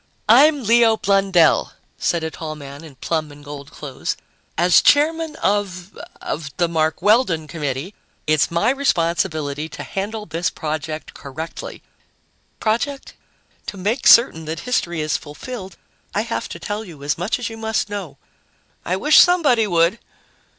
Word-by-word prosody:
"I'm 280 +5 +6
Leo 230 0 +4
Blundell," 195 -5 +3 0.3
said 160 +5 0
a 160 - -3
tall 155 0 -6
man 140 0 -10
in 155 -4 -12
plum 155 +2 -2
and 145 0 -14
gold 145 -1 -9
clothes. 145 -3 -5 0.4
"As 175 +1 +5
chairman 315 +2 +3
of 195 -2 -2 0.2
of 150 -1 -4
the 175 - +2
Mark 160 +1 -1
Weldon 205 -7 +3
Committee, 150 +3 -4 0.3
it's 155 -1 +2
my 170 +8 +2
responsibility 165 - 0
to - - -8
handle 210 +2 -4
this 170 -2 -1
project 155 -1 -5
correctly." 150 +4 -8 0.8
"Project?" 255 +6 -2 0.5
"To 200 - -6
make 210 +7 0
certain 195 -9 +6
that 160 +1 -4
history 175 -10 -1
is 155 0 0
fulfilled, 190 - -9 0.4
I - - +2
have - - -4
to - - -7
tell 210 0 -4
you 160 -9 -12
as 150 +3 -1
much 180 +6 -1
as 245 - -4
you 225 - -8
must 220 -1 -1
know." 195 -9 -6 0.7
"I 180 - -1
wish 295 +11 +5
somebody 290 -11 +4
would!" 170 +3 +2
175 Hz, 150 wpm, -20 LUFS, 155-220 Hz, 0.8 s, I'm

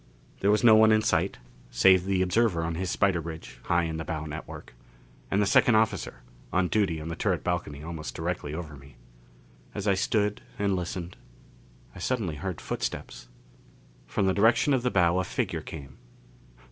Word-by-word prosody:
There 100 - +2
was 105 +2 +3
no 115 -2 +8
one 110 0 +6
in 110 0 +3
sight 90 +1 +1 0.3
save 95 +9 +4
the 95 -1 +1
observer 95 -2 +1
on 80 0 -2
his 90 +2 -3
spider 95 -3 +1
bridge, 80 0 -9
high 85 0 +2
in 80 -1 -3
the 80 - -4
bow 80 -1 -4
network, 75 -4 -8 0.6
and 100 - +1
the 105 - +3
second 110 +3 +4
officer, 110 0 0 0.3
on 90 -1 +1
duty 100 -7 +1
on 80 +1 -6
the 85 - -4
turret - - -1
balcony 85 -5 -3
almost 80 -2 -6
directly 80 -3 -3
over 80 -1 -6
me. 70 -1 -15 0.8
As 105 0 -3
I 100 - +4
stood 105 +2 0 0.2
and 100 -1 +1
listened, 90 0 -5 0.8
I - - -11
suddenly 95 -5 -2
heard 90 +1 -4
footsteps. - - -5 0.8
From 100 - 0
the 95 - +2
direction 115 +8 +3
of 130 - +2
the 125 - +1
bow 90 -4 +3
a - - +1
figure - - -2
came. 70 -5 -10
90 Hz, 180 wpm, -27 LUFS, 80-100 Hz, 0.8 s, no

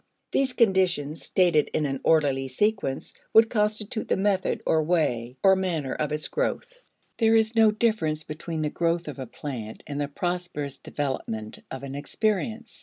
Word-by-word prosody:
These 265 -2 +1
conditions, 185 - +2
stated 175 -5 +3
in 155 - +1
an 135 -1 -2
orderly 140 -4 +3
sequence, 195 -1 -1 0.2
would 225 0 +7
constitute 210 0 -1
the - - +1
method 195 -1 0
or 160 - +3
way 135 -7 0
or 190 0 +7
manner 170 -8 -1
of 150 -1 -2
its 150 0 -1
growth. - - -3 0.4
There 225 -1 +5
is 220 +1 +2
no 225 -1 +6
difference 210 -9 0
between 155 +1 -4
the 150 - -1
growth 170 0 0
of 145 -2 -6
a 130 - -5
plant 115 -4 -7
and 145 0 -4
the 145 - -1
prosperous 175 -2 -3
development 115 -6 -4
of 130 - -7
an 135 -1 -6
experience. 220 +9 -2
165 Hz, 165 wpm, -26 LUFS, 145-210 Hz, 0.4 s, would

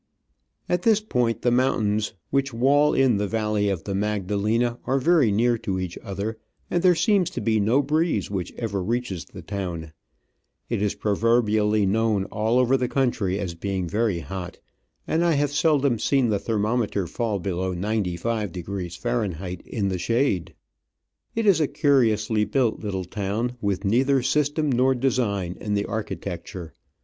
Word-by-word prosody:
At 180 0 0
this 220 +1 +4
point 125 - -1
the 120 - +3
mountains 110 -5 +1 0.2
which 135 -2 0
wall 145 +5 +3
in 130 -5 +3
the 100 0 -1
valley 105 -1 0
of 95 -4 -2
the 100 - -4
Magda 105 0 -1
lena 115 +4 +1
are 135 +1 +2
very 150 -5 +3
near 115 +3 +2
to 95 -3 -2
each 90 -2 -4
other, 100 +3 -5 0.3
and 175 - +1
there 180 -1 +5
seems 200 -1 +2
to - - -5
be 110 -1 +1
no 115 +8 +3
breeze 155 - 0
which 95 -3 -3
ever 105 -5 -3
reaches 105 -3 -2
the 90 -3 -11
town; 85 -5 -5 0.8
it - - -1
is 105 -1 0
pro 105 - -1
verbially 110 -2 +2
known 110 0 +1
all 110 +3 +1
over 130 +1 +4
the 125 -1 0
country 120 -8 0
as 95 -4 -3
being 95 +1 -3
very 105 -2 0
hot, 90 -1 -6 0.5
and 165 +2 +1
I 170 -1 +3
have 145 -1 +1
seldom 145 -5 +2
seen 135 -1 +2
the 105 -2 +1
thermometer 105 -1 0
fall 110 +4 -2
below 95 0 -2
95° 95 -2 -3
Fahr. 120 -1 -1 0.4
in 100 -5 -2
the 95 -1 -2
shade. 115 -5 0 0.8
It 225 -1 0
is 190 -6 +5
a 150 - +3
curiously 120 -7 +2
built 125 -1 0
little 95 -3 -3
town, 105 +6 -2
with 100 -1 -1
neither 130 +5 +3
system 150 +2 +1
nor 130 +1 +3
design 105 -8 -1
in 105 -1 -1
the 100 - +1
architec 100 -5 -4
ture. 90 -5 -8
110 Hz, 165 wpm, -24 LUFS, 100-130 Hz, 0.8 s, there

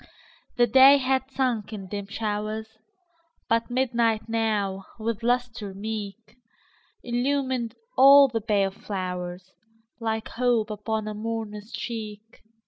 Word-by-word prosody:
The 240 - +6
day 265 +4 +8
had 265 0 0
sunk 250 -6 -1
in 200 -3 -7
dim 200 +1 -5
showers, 215 +1 -4 0.7
But 230 +1 +1
midnight 235 -3 +1
now, 210 -4 -1
with 225 0 -3
lustre 240 -4 -1
meek, 215 +2 -6 0.7
Illumined 250 -1 -1 0.2
all 275 +1 +9
the 230 -3 -3
pale 200 -2 +1
flowers, 180 -2 -5 0.5
Like 220 -1 -2
hope 235 -3 +1
upon 215 +1 -3
a 215 - -3
mourner's 215 0 -5
cheek. 220 -2 -7
220 Hz, 115 wpm, -26 LUFS, 210-245 Hz, 0.7 s, all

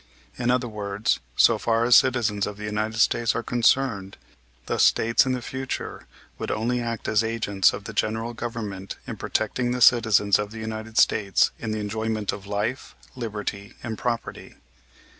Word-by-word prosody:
In 120 -1 -1
other 125 0 +2
words, 105 -1 -1 0.2
so - - +5
far 115 0 +1
as 120 0 +6
citizens 115 -6 +3
of 105 -1 -6
the 105 - -8
United 110 +1 -2
States 115 +1 +2
are - - -2
concerned, 120 -4 +1 0.5
the - - -2
States 115 +3 +4
in 130 - +1
the 125 -1 -4
future 130 0 -5 0.3
would - - -4
only 120 +3 -1
act 115 -1 -4
as 110 +1 +2
agents 110 -5 +2
of - - -7
the - - -8
general 115 +2 -1
Government 110 -5 -5
in - - -5
protecting 125 -1 -1
the 125 - -2
citizens 110 -5 +5
of 105 0 -3
the 110 - -10
United 110 0 -6
States 100 -3 +3
in 110 - -4
the 110 - -2
enjoyment 110 -1 -2
of 100 -1 -8
life, 105 +6 -3 0.2
liberty, 105 -3 -5
and 115 -2 -4
property. 115 +1 -4
110 Hz, 170 wpm, -24 LUFS, 105-120 Hz, 0.5 s, as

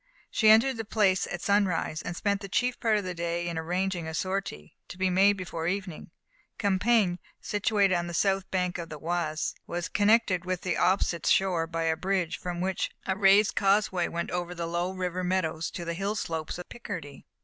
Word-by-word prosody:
She 220 - +4
entered 230 +4 +5
the 225 - -3
place 200 -3 +2
at 175 - -5
sunrise, 190 -6 +1
and 175 - -5
spent 200 -1 0
the 195 - -7
chief 250 +5 0
part 220 -2 +2
of 205 - -2
the 180 -1 -4
day 170 0 -2
in 170 - -3
arranging 175 +1 -2
a 160 - -4
sortie, 185 - -3
to - - -10
be 185 0 +1
made 195 +3 +5
before 175 -4 -4
evening. 190 -2 -4 0.5
Compiègne, 200 -2 +2 0.2
situated 205 -2 +1
on 175 -1 0
the 170 - -5
south 195 +1 +1
bank 180 -1 -1
of 170 -1 -6
the 155 - -7
Oise, 160 -1 -2
was 175 0 -3
connected 205 -4 +3
with 185 -1 -2
the 185 - -1
opposite 180 -3 +1
shore 180 -4 +2
by 165 0 -2
a 160 0 +1
bridge, 180 -1 -1
from 175 -1 -4
which 190 0 -1 0.2
a 190 - 0
raised 200 +1 +5
causeway 195 -3 +2
went 170 0 -4
over 180 0 -3
the 170 -1 -3
low 175 +2 -1
river 185 -1 -3
meadows 170 -3 -1
to 175 - -6
the 170 - -2
hill 195 +4 -2
slopes 160 -6 -3
of 180 - -8
Picardy. 175 -12 -8
185 Hz, 200 wpm, -28 LUFS, 170-195 Hz, 0.5 s, entered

